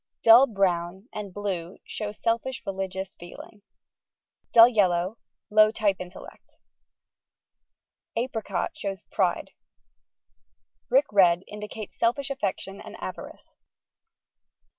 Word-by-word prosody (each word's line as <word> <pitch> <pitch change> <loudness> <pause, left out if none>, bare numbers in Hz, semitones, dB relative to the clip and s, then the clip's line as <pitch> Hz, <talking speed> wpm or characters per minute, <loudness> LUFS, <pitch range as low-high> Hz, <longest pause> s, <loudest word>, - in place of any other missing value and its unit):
Dull 235 +4 +8
Brown 190 -1 -1
and 210 -2 -6
blue 185 -3 -4
show 210 -1 -4
selfish 230 +4 -2
religious 190 0 -4
feeling; 175 +4 -12 0.9
dull 230 0 +9
yellow, 190 -3 +1 0.3
low 215 0 +6
type 210 -3 0
intellect; 180 0 -11 1.6
Apricot 230 -2 -2
shows 195 -3 -5
pride; - - 0 1.4
Brick 270 +4 +4
Red 180 -3 +4
indicates 210 0 -8
selfish 260 +4 +1
aiFection 200 -5 -4
and - - -10
avarice. - - -9
205 Hz, 95 wpm, -26 LUFS, 190-225 Hz, 1.6 s, dull